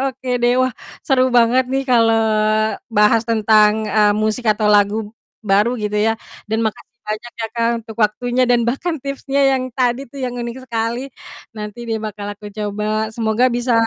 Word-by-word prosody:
oke 260 Hz, 0 st, -9 dB
deh 240 Hz, 0 st, +3 dB
wah, 255 Hz, 0 st, +1 dB, 0.3 s
seru 260 Hz, -3 st, +3 dB
banget 245 Hz, +1 st, +3 dB
nih 270 Hz, +1 st, -1 dB
kalau 230 Hz, -3 st, +3 dB, 0.7 s
bahas 210 Hz, +1 st, +4 dB
tentang, 215 Hz, -1 st, +3 dB
eee, 210 Hz, -1 st, +3 dB
musik 215 Hz, +2 st, -1 dB
atau 215 Hz, 0 st, +2 dB
lagu 205 Hz, +1 st, +2 dB, 0.3 s
baru 210 Hz, +5 st, +2 dB
gitu 210 Hz, -2 st, -3 dB
ya 225 Hz, 0 st, +1 dB, 0.3 s
dan 220 Hz, -, 0 dB
makasih 240 Hz, +2 st, -5 dB
banyak 215 Hz, +3 st, -5 dB
ya -, -, -1 dB
Kak 230 Hz, -1 st, +1 dB, 0.2 s
untuk 225 Hz, -, -10 dB
waktunya 245 Hz, +4 st, +1 dB
dan 240 Hz, -1 st, +4 dB
bahkan 320 Hz, +8 st, -1 dB
tipsnya 275 Hz, 0 st, -2 dB
yang 260 Hz, -1 st, 0 dB
tadi 250 Hz, -1 st, +1 dB
tuh 275 Hz, -, -11 dB
yang 250 Hz, -, -3 dB
unik 235 Hz, +1 st, -5 dB
sekali, 235 Hz, +2 st, -3 dB, 0.4 s
nanti 210 Hz, +1 st, -7 dB
deh 225 Hz, -1 st, -1 dB
bakal 210 Hz, -1 st, -6 dB
aku 205 Hz, 0 st, -10 dB
coba 210 Hz, +1 st, -3 dB
semoga 220 Hz, +1 st, +1 dB
bisa, 245 Hz, +1 st, 0 dB
225 Hz, 170 wpm, -19 LUFS, 215-245 Hz, 0.7 s, bahas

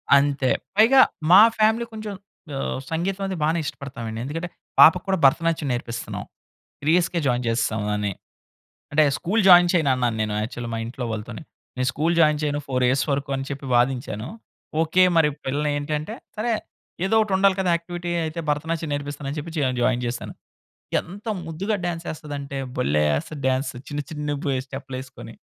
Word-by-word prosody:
అంతే 140 Hz, -2 st, +2 dB, 0.3 s
పైగా 235 Hz, +5 st, +6 dB, 0.3 s
మా 190 Hz, +3 st, +10 dB, 0.2 s
ఫ్యామిలీ 220 Hz, +2 st, +3 dB
కొంచెం 215 Hz, -1 st, -5 dB, 0.4 s
ఆహ్, 135 Hz, -, -2 dB
సంగీతం 185 Hz, +4 st, -1 dB
అనేది 190 Hz, -1 st, -3 dB
బాగానే 160 Hz, +3 st, +2 dB
ఇష్టపడతామండి. 125 Hz, -5 st, -6 dB
ఎందుకంటే, 165 Hz, +5 st, -4 dB, 0.3 s
పాపకి 180 Hz, +2 st, +8 dB
కూడా 190 Hz, 0 st, +2 dB
భరతనాట్యం 160 Hz, +2 st, +2 dB
నేర్పిస్తున్నాం. 120 Hz, -1 st, -5 dB, 0.6 s
3 150 Hz, -, 0 dB
ఇయర్స్‌కే 175 Hz, -1 st, +1 dB
జాయిన్ 125 Hz, -1 st, +1 dB
చేసేస్తాం 115 Hz, -2 st, 0 dB
అని. 105 Hz, -1 st, -1 dB, 0.8 s
అంటే 155 Hz, +2 st, +5 dB
స్కూలు 205 Hz, +6 st, 0 dB
జాయిన్ 175 Hz, -1 st, +8 dB
చేయనన్నాను 130 Hz, -9 st, +2 dB
నేను 105 Hz, -1 st, -2 dB
యాక్చువల్ 120 Hz, +2 st, -5 dB
మా 115 Hz, -, -2 dB
ఇంట్లో 125 Hz, +2 st, -5 dB
వాళ్ళతోని. 110 Hz, +3 st, -6 dB, 0.3 s
నేను 130 Hz, 0 st, 0 dB
స్కూలు 160 Hz, +5 st, +1 dB
జాయిన్ 150 Hz, -2 st, +4 dB
చేయను 145 Hz, -1 st, 0 dB
4 130 Hz, -2 st, 0 dB
యఇయర్స్ 130 Hz, +2 st, +2 dB
వరకు 140 Hz, 0 st, -2 dB
అని 135 Hz, -, -3 dB
చెప్పి 140 Hz, 0 st, -5 dB
వాదించాను. 120 Hz, -3 st, 0 dB, 0.5 s
ఓకే. 165 Hz, +3 st, +3 dB
మరి 160 Hz, -2 st, +5 dB, 0.2 s
పిల్లల్ని 145 Hz, +2 st, 0 dB
ఏంటంటే, 150 Hz, +8 st, -3 dB, 0.2 s
సరే 230 Hz, +3 st, 0 dB, 0.5 s
ఏదో 195 Hz, -, +1 dB
ఒకటి 215 Hz, -2 st, -3 dB
ఉండాలి 195 Hz, 0 st, +4 dB
కదా 185 Hz, -2 st, +1 dB
యాక్టివిటీ 175 Hz, +1 st, -6 dB, 0.2 s
అయితే 160 Hz, +2 st, -4 dB
భరతనాట్యం 160 Hz, +2 st, -2 dB
నేర్పిస్తాను 145 Hz, 0 st, -5 dB
అని 150 Hz, -, -5 dB
చెప్పి 160 Hz, +3 st, -6 dB
చె -, -, 0 dB, 0.2 s
జాయిన్ 125 Hz, 0 st, +1 dB
చేశాను. 120 Hz, 0 st, -5 dB, 0.7 s
ఎంత 200 Hz, +6 st, -12 dB, 0.2 s
ముద్దుగా 185 Hz, +7 st, -2 dB
డాన్స్ 170 Hz, -1 st, -3 dB
చేస్తాదంటే 145 Hz, -3 st, -6 dB, 0.2 s
భలే! 75 Hz, +2 st, +2 dB, 0.2 s
ఎస్తది 150 Hz, -, -8 dB
డాన్స్ 130 Hz, +2 st, 0 dB, 0.2 s
చిన్న, 145 Hz, -1 st, -3 dB
చిన్న 150 Hz, -1 st, -4 dB
బు -, -, -1 dB, 0.2 s
స్టెప్‌లేసుకొని. 130 Hz, -1 st, -8 dB
145 Hz, 160 wpm, -23 LUFS, 130-175 Hz, 0.8 s, మా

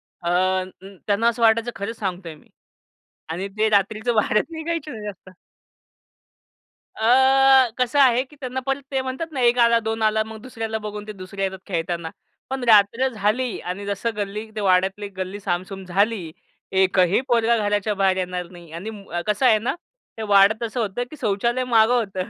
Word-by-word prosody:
अ, 185 Hz, +2 st, -1 dB, 0.4 s
त्यांना 210 Hz, +3 st, +2 dB
असं 235 Hz, 0 st, -2 dB
वाटायचं 230 Hz, +1 st, +3 dB
खरंच 215 Hz, +3 st, -5 dB
सांगतोय 180 Hz, -5 st, -4 dB
मी. 150 Hz, -, -21 dB, 0.8 s
आणि 180 Hz, +4 st, -3 dB
ते 220 Hz, 0 st, +2 dB
रात्रीचं 215 Hz, +3 st, +1 dB
बाहेरच 215 Hz, 0 st, +2 dB
निघायचे 320 Hz, -1 st, -4 dB
नाही 215 Hz, -3 st, -8 dB
जास्त. 190 Hz, -2 st, -9 dB, 1.7 s
अ, 265 Hz, +2 st, +5 dB
कसं 255 Hz, +3 st, +1 dB
आहे 255 Hz, -2 st, +5 dB
की 295 Hz, +3 st, -19 dB
त्यांना 260 Hz, -1 st, -4 dB
पण 270 Hz, +1 st, 0 dB
ते 265 Hz, -1 st, 0 dB
म्हणतात 265 Hz, +5 st, -5 dB
ना, 275 Hz, -, -4 dB
1 240 Hz, 0 st, +4 dB
आला 235 Hz, 0 st, +5 dB
2 225 Hz, 0 st, -2 dB
आला 215 Hz, 0 st, +2 dB
मग 220 Hz, 0 st, -9 dB
दुसऱ्याला 225 Hz, -3 st, -4 dB
बघून 210 Hz, 0 st, -7 dB
ते -, -, -5 dB
दुसऱ्या 195 Hz, +1 st, -6 dB
येतात 190 Hz, -1 st, -5 dB
खेळताना. 170 Hz, -2 st, -3 dB, 0.4 s
पण 265 Hz, -1 st, -3 dB
रात्र 220 Hz, +5 st, +5 dB
झाली 225 Hz, +2 st, -1 dB
आणि 190 Hz, +3 st, -5 dB
जसं 205 Hz, +3 st, -2 dB
गल्ली 210 Hz, +1 st, -4 dB
ते 215 Hz, -, -3 dB
वाड्यातली 195 Hz, +1 st, +1 dB
गल्ली 190 Hz, +2 st, -4 dB
सामसूम 190 Hz, 0 st, -4 dB
झाली. 195 Hz, -2 st, 0 dB, 0.4 s
एकही 190 Hz, +2 st, +3 dB
पोरगा 235 Hz, -1 st, +3 dB
घराच्या 205 Hz, 0 st, 0 dB
बाहेर 190 Hz, -1 st, +2 dB
येणार 180 Hz, -1 st, -3 dB
नाही. 170 Hz, -3 st, -14 dB
आणि 170 Hz, +6 st, -6 dB
म 195 Hz, -5 st, -6 dB
कसं 210 Hz, +5 st, +1 dB
आहे 220 Hz, -3 st, +6 dB
ना 235 Hz, -, -2 dB, 0.4 s
ते 220 Hz, -, -4 dB
वाड्यात 205 Hz, +2 st, +4 dB
असं 240 Hz, +2 st, -5 dB
होतं 220 Hz, +2 st, -1 dB
की 305 Hz, -, -8 dB
शौचालय 235 Hz, +4 st, 0 dB
मागं 235 Hz, -1 st, +4 dB
होतं. 195 Hz, -6 st, -1 dB
215 Hz, 170 wpm, -22 LUFS, 190-235 Hz, 1.7 s, आहे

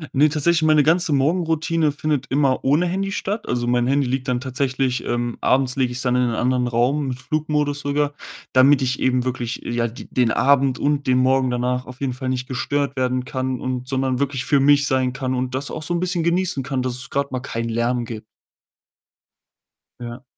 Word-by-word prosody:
Ne, 150 Hz, +3 st, +5 dB
tatsächlich 160 Hz, +2 st, +2 dB
meine 155 Hz, -1 st, +4 dB
ganze 165 Hz, +2 st, +2 dB
Morgenroutine 160 Hz, +1 st, +1 dB
findet 145 Hz, -2 st, -2 dB
immer 135 Hz, -1 st, +1 dB
ohne 150 Hz, +6 st, +3 dB
Handy 195 Hz, +2 st, -2 dB
statt. 205 Hz, +1 st, -3 dB
Also, 120 Hz, -1 st, 0 dB
mein 120 Hz, 0 st, +1 dB
Handy 140 Hz, +1 st, +2 dB
liegt 130 Hz, +1 st, -2 dB
dann 125 Hz, -2 st, 0 dB
tatsächlich, 130 Hz, 0 st, -1 dB
ähm 120 Hz, 0 st, -2 dB
abends 130 Hz, -1 st, +2 dB
lege 130 Hz, -3 st, 0 dB
ich's 125 Hz, +1 st, -3 dB
dann 125 Hz, -1 st, +1 dB
in 125 Hz, -, +3 dB
einen 120 Hz, -2 st, 0 dB
anderen 125 Hz, 0 st, +1 dB
Raum 125 Hz, +5 st, +1 dB
mit 125 Hz, -1 st, -3 dB
Flugmodus 150 Hz, +1 st, -1 dB
sogar, 145 Hz, +1 st, -1 dB, 0.4 s
damit 135 Hz, +1 st, +5 dB
ich 130 Hz, +1 st, -1 dB
eben 130 Hz, -1 st, +1 dB
wirklich, 125 Hz, -2 st, -3 dB
ja, 120 Hz, 0 st, -1 dB
d 120 Hz, +2 st, -10 dB
den 125 Hz, -2 st, +2 dB
Abend 135 Hz, 0 st, +3 dB
und 145 Hz, -1 st, 0 dB
den 130 Hz, -1 st, +3 dB
Morgen 130 Hz, 0 st, +3 dB
danach 125 Hz, +1 st, -1 dB
auf 125 Hz, 0 st, -11 dB
jeden 135 Hz, -2 st, -2 dB
Fall 130 Hz, +1 st, -4 dB
nicht 125 Hz, 0 st, -2 dB
gestört 140 Hz, +2 st, -2 dB
werden 130 Hz, -1 st, -1 dB
kann 130 Hz, -1 st, -3 dB
und 130 Hz, -1 st, -4 dB
sondern 130 Hz, -1 st, -1 dB
wirklich 140 Hz, -2 st, -1 dB
für 145 Hz, -, +3 dB
mich 145 Hz, +1 st, +4 dB
sein 130 Hz, -2 st, +1 dB
kann 130 Hz, -1 st, -2 dB
und 130 Hz, 0 st, -2 dB
das 140 Hz, +2 st, -3 dB
auch 155 Hz, -, -5 dB
so 175 Hz, +3 st, -2 dB
'n -, -, 0 dB
bisschen 180 Hz, -1 st, -1 dB
genießen 170 Hz, -4 st, 0 dB
kann, 130 Hz, -1 st, -2 dB
dass 125 Hz, -1 st, -2 dB
es 125 Hz, +2 st, -6 dB
grad 140 Hz, 0 st, -1 dB
mal 130 Hz, -, -2 dB
keinen 115 Hz, -2 st, -4 dB
Lärm 120 Hz, +1 st, 0 dB
gib 110 Hz, -2 st, -7 dB, 1.8 s
Ja. 120 Hz, +1 st, -8 dB
130 Hz, 205 wpm, -21 LUFS, 125-145 Hz, 1.8 s, Ne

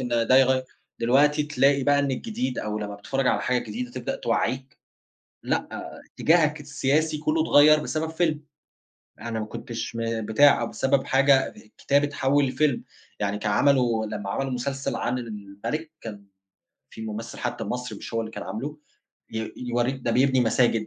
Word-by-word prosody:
إن 125 Hz, -, -3 dB
ده 120 Hz, +2 st, +3 dB
يغيّر 130 Hz, -1 st, +4 dB, 0.4 s
دلوقتي 145 Hz, +5 st, +4 dB
تلاقي 140 Hz, -1 st, +2 dB
بقى 145 Hz, 0 st, +4 dB
إن 140 Hz, -1 st, +1 dB
الجديد، 130 Hz, -, -3 dB
أو 105 Hz, 0 st, -3 dB
لمّا 105 Hz, -1 st, -5 dB
بتتفرّج 135 Hz, +6 st, -2 dB
على -, -, +2 dB
حاجة 125 Hz, 0 st, +1 dB
جديدة 250 Hz, +1 st, -5 dB
تبدأ -, -, -4 dB
توعّيك، 135 Hz, -, -2 dB, 0.6 s
لأ، -, -, -1 dB, 0.5 s
إتجّاهك 155 Hz, -2 st, +3 dB
السياسي 150 Hz, +2 st, 0 dB
كلّه 155 Hz, +1 st, +1 dB
اتغيّر 155 Hz, 0 st, +6 dB
بسبب 155 Hz, +1 st, -2 dB
فيلم. 160 Hz, -2 st, 0 dB, 0.8 s
أنا 115 Hz, -1 st, -3 dB
ما 110 Hz, -, -3 dB
كنتش، 115 Hz, +2 st, -6 dB
م 115 Hz, -1 st, -2 dB
بتاع، 140 Hz, +7 st, +5 dB
أو -, -, -1 dB
بسبب 135 Hz, 0 st, +1 dB
حاجة 135 Hz, 0 st, +4 dB
ب -, -, -19 dB, 0.2 s
كتاب 140 Hz, +1 st, +2 dB
اتحوّل 145 Hz, 0 st, +1 dB
لفيلم. 130 Hz, 0 st, +1 dB, 0.4 s
يعني 100 Hz, 0 st, -1 dB
كان 105 Hz, 0 st, -1 dB
عملوا 120 Hz, -3 st, +3 dB
لما 105 Hz, -2 st, -5 dB
عملوا 135 Hz, +6 st, -2 dB
مسلسل 135 Hz, +2 st, -2 dB
عن 125 Hz, +1 st, -1 dB
المَلِك، 110 Hz, +8 st, -6 dB
كان 105 Hz, -3 st, -8 dB, 0.6 s
في 110 Hz, -, -10 dB
ممثل 110 Hz, +2 st, -6 dB
حتى -, -, -3 dB
المصري 125 Hz, +4 st, -4 dB
مش -, -, -9 dB
هو 115 Hz, -, +1 dB
اللي 110 Hz, 0 st, -6 dB
كان -, -, -6 dB
عامله 145 Hz, +7 st, -5 dB, 0.6 s
ي 110 Hz, 0 st, -4 dB
يورّيك 125 Hz, +2 st, -1 dB
ده 120 Hz, -, +1 dB
بيبني 130 Hz, +2 st, +3 dB
مساجد، 115 Hz, -1 st, +2 dB
130 Hz, 165 wpm, -25 LUFS, 115-145 Hz, 0.8 s, اتغيّر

